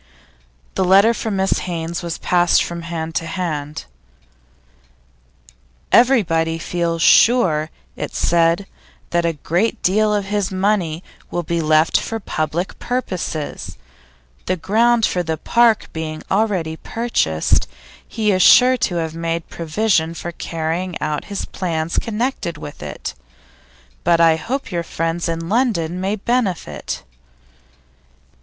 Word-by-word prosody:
The 190 Hz, -, 0 dB
letter 195 Hz, +5 st, +5 dB
from 220 Hz, -3 st, -3 dB
Mrs 190 Hz, 0 st, +1 dB
Haynes 170 Hz, -2 st, -4 dB
was 170 Hz, -2 st, -4 dB
passed 175 Hz, -1 st, +3 dB
from 170 Hz, 0 st, -5 dB
hand 165 Hz, -1 st, -5 dB
to 165 Hz, -, -2 dB
hand. 155 Hz, -, -4 dB, 2.1 s
'Everybody 165 Hz, -11 st, +3 dB
feels 170 Hz, 0 st, -1 dB
sure,' 170 Hz, -11 st, +5 dB, 0.3 s
it -, -, -5 dB
said, 170 Hz, +3 st, +2 dB, 0.5 s
'that 170 Hz, 0 st, +1 dB
a 165 Hz, -, 0 dB
great 175 Hz, +8 st, -1 dB
deal 210 Hz, +3 st, +3 dB
of 205 Hz, -1 st, 0 dB
his 205 Hz, -1 st, -1 dB
money 185 Hz, -4 st, 0 dB, 0.3 s
will 175 Hz, -, -2 dB
be 170 Hz, +1 st, -1 dB
left 155 Hz, +1 st, +3 dB
for 225 Hz, -, -4 dB
public 170 Hz, -2 st, -3 dB
purposes. 185 Hz, -, -4 dB, 0.7 s
The 185 Hz, -, 0 dB
ground 225 Hz, +6 st, +3 dB
for 180 Hz, -, 0 dB
the 160 Hz, -2 st, -2 dB
park 235 Hz, +4 st, +2 dB
being 155 Hz, -1 st, -5 dB
already 190 Hz, -6 st, 0 dB
purchased, 160 Hz, -, 0 dB, 0.4 s
he 215 Hz, -2 st, 0 dB
is 185 Hz, -1 st, +2 dB
sure 255 Hz, +6 st, +7 dB
to 185 Hz, -6 st, -1 dB
have 160 Hz, -2 st, -2 dB
made 165 Hz, 0 st, -3 dB
provision 170 Hz, -1 st, 0 dB
for 175 Hz, -, -5 dB
carrying 165 Hz, +2 st, -3 dB
out 150 Hz, -1 st, -2 dB
his 200 Hz, -1 st, -4 dB
plans 165 Hz, -3 st, -2 dB
connected 225 Hz, -, -2 dB
with 145 Hz, -1 st, -9 dB
it. -, -, -6 dB, 0.9 s
But 170 Hz, -1 st, +3 dB
I 165 Hz, -1 st, +6 dB
hope 255 Hz, -, -4 dB
your 170 Hz, -1 st, -1 dB
friends 165 Hz, +1 st, -2 dB
in 165 Hz, 0 st, -3 dB
London 185 Hz, -7 st, 0 dB
may 195 Hz, +2 st, 0 dB
benefit. 215 Hz, -4 st, -2 dB
175 Hz, 130 wpm, -20 LUFS, 165-210 Hz, 2.1 s, sure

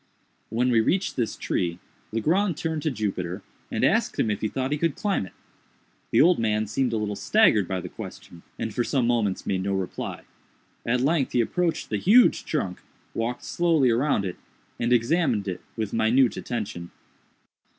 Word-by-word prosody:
When 125 Hz, +2 st, +1 dB
we 115 Hz, -2 st, +4 dB
reached 185 Hz, -, 0 dB
this 120 Hz, -3 st, -1 dB
tree, 85 Hz, -1 st, -1 dB, 0.3 s
Legrand 165 Hz, -, +1 dB
turned 160 Hz, -2 st, -2 dB
to 155 Hz, -, 0 dB
Jupiter, 100 Hz, -, -3 dB, 0.3 s
and -, -, -2 dB
asked -, -, +2 dB
him 110 Hz, -, +2 dB
if 105 Hz, -, -3 dB
he 110 Hz, -, +1 dB
thought 130 Hz, +4 st, -3 dB
he 150 Hz, -, +1 dB
could 165 Hz, -3 st, 0 dB
climb 195 Hz, -, -1 dB
it. -, -, -17 dB, 0.8 s
The -, -, +4 dB
old 175 Hz, +2 st, +5 dB
man 110 Hz, -1 st, +1 dB
seemed 125 Hz, +4 st, 0 dB
a 115 Hz, -, 0 dB
little 105 Hz, -1 st, -2 dB
staggered 115 Hz, -, +3 dB
by 95 Hz, -1 st, -2 dB
the -, -, -6 dB
question, 85 Hz, -, -10 dB, 0.2 s
and 110 Hz, -, -3 dB
for 120 Hz, -, 0 dB
some 130 Hz, -1 st, +1 dB
moments 115 Hz, -5 st, 0 dB
made 95 Hz, -1 st, 0 dB
no 100 Hz, +1 st, -1 dB
reply. 95 Hz, -1 st, -4 dB, 0.6 s
At 125 Hz, +1 st, +2 dB
length 145 Hz, 0 st, +1 dB
he -, -, +2 dB
approached 170 Hz, +8 st, -1 dB
the 105 Hz, -, +1 dB
huge 230 Hz, -, +5 dB
trunk, 95 Hz, -, -2 dB, 0.3 s
walked 120 Hz, +2 st, -3 dB
slowly 160 Hz, -7 st, +2 dB
around 120 Hz, -3 st, +1 dB
it, 90 Hz, -, -4 dB, 0.4 s
and 120 Hz, +1 st, 0 dB
examined 120 Hz, -, +2 dB
it 90 Hz, -1 st, -4 dB, 0.2 s
with 110 Hz, -2 st, -3 dB
minute 115 Hz, +3 st, +3 dB
attention. 105 Hz, -7 st, -5 dB
115 Hz, 180 wpm, -25 LUFS, 105-150 Hz, 0.8 s, old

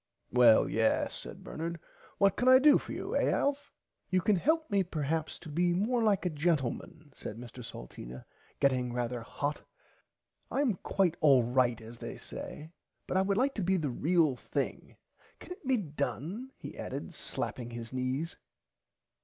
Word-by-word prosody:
Well 120 Hz, -3 st, +6 dB
yes 110 Hz, 0 st, +1 dB
said -, -, -8 dB
Bernard 170 Hz, +1 st, -4 dB, 0.4 s
what 200 Hz, -1 st, +4 dB
can 245 Hz, -, 0 dB
I 260 Hz, 0 st, +10 dB
do 290 Hz, +2 st, +6 dB
for -, -, -9 dB
you -, -, -4 dB
eh -, -, +3 dB
Alf? 285 Hz, 0 st, 0 dB, 0.4 s
You 185 Hz, -, +3 dB
can 205 Hz, +4 st, +3 dB
help 315 Hz, -, +2 dB
me 200 Hz, -1 st, +4 dB
perhaps 160 Hz, -2 st, -2 dB
to -, -, -12 dB
be 175 Hz, +3 st, +1 dB
more 230 Hz, +6 st, +1 dB
like 205 Hz, -4 st, +2 dB
a 180 Hz, -, +1 dB
gentleman 150 Hz, -1 st, -1 dB
said 105 Hz, -, -7 dB
Mr 120 Hz, +1 st, -9 dB
Salteena 60 Hz, -, -9 dB, 0.3 s
getting 130 Hz, -3 st, +2 dB
rarther 120 Hz, 0 st, -2 dB
hot 145 Hz, +5 st, -3 dB, 0.9 s
I 275 Hz, -, 0 dB
am 240 Hz, -10 st, +1 dB
quite 175 Hz, -2 st, +1 dB
alright 125 Hz, -4 st, +4 dB
as 115 Hz, +1 st, -11 dB
they -, -, -6 dB
say 155 Hz, +2 st, -7 dB, 0.3 s
but -, -, -3 dB
I 190 Hz, -, +5 dB
would 195 Hz, +1 st, +1 dB
like 270 Hz, +3 st, +2 dB
to 210 Hz, -, -2 dB
be 190 Hz, +2 st, +2 dB
the 150 Hz, -6 st, -1 dB
real 155 Hz, +1 st, +2 dB
thing -, -, -4 dB, 0.4 s
can -, -, -12 dB
it 360 Hz, -6 st, -8 dB
be 260 Hz, -1 st, +4 dB
done 165 Hz, -, -3 dB
he -, -, -8 dB
added -, -, -5 dB
slapping 120 Hz, -3 st, -4 dB
his 115 Hz, 0 st, -7 dB
knees. 130 Hz, +6 st, -2 dB
160 Hz, 170 wpm, -31 LUFS, 125-195 Hz, 0.9 s, I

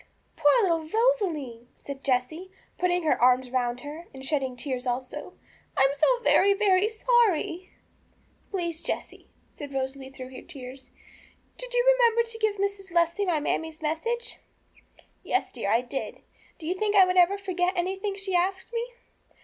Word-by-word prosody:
'Poor 360 Hz, +11 st, +4 dB
little 330 Hz, -4 st, 0 dB
Rosalie!' 335 Hz, -, 0 dB
said 275 Hz, -1 st, -9 dB
Jessie, 280 Hz, +8 st, -1 dB, 0.3 s
putting 360 Hz, -1 st, +1 dB
her 310 Hz, -, +1 dB
arms 250 Hz, 0 st, +4 dB
round 245 Hz, -1 st, -1 dB
her, 305 Hz, +5 st, -8 dB
and 265 Hz, 0 st, -8 dB
shedding 270 Hz, -4 st, -1 dB
tears 255 Hz, -1 st, -4 dB
also. 250 Hz, +1 st, -4 dB, 0.4 s
'I -, -, +5 dB
am 270 Hz, +1 st, +3 dB
so 475 Hz, +13 st, +3 dB
very, 400 Hz, +1 st, +5 dB
very 395 Hz, -1 st, +3 dB
sorry!' 435 Hz, -7 st, +1 dB, 0.8 s
'Please, 340 Hz, -4 st, -3 dB
Jessie,' -, -, -5 dB, 0.2 s
said 285 Hz, -1 st, -8 dB
Rosalie 265 Hz, 0 st, -3 dB
through 260 Hz, -1 st, -10 dB
her -, -, -8 dB
tears, 260 Hz, -4 st, -10 dB, 0.7 s
'did -, -, -6 dB
you 485 Hz, 0 st, +3 dB
remember 470 Hz, -1 st, +4 dB
to 455 Hz, 0 st, -5 dB
give 435 Hz, -2 st, +1 dB
Mrs. 400 Hz, -1 st, -3 dB
Leslie 340 Hz, +3 st, +1 dB
my 330 Hz, -4 st, +2 dB
mammie's 320 Hz, +1 st, -2 dB
message?' 460 Hz, +10 st, -2 dB, 0.8 s
'Yes, 375 Hz, -, -1 dB
dear, 225 Hz, -5 st, -3 dB
that 215 Hz, -, +4 dB
I 235 Hz, -, +3 dB
did. 250 Hz, +2 st, -6 dB, 0.3 s
Do 320 Hz, -, -10 dB
you 345 Hz, -, 0 dB
think 415 Hz, +2 st, -1 dB
I 385 Hz, -2 st, +8 dB
would 365 Hz, +2 st, +3 dB
forget 370 Hz, -1 st, -1 dB
anything 385 Hz, +3 st, -1 dB
she 390 Hz, -1 st, -4 dB
asked 380 Hz, +5 st, 0 dB
me? 465 Hz, 0 st, 0 dB
345 Hz, 160 wpm, -27 LUFS, 270-400 Hz, 0.8 s, I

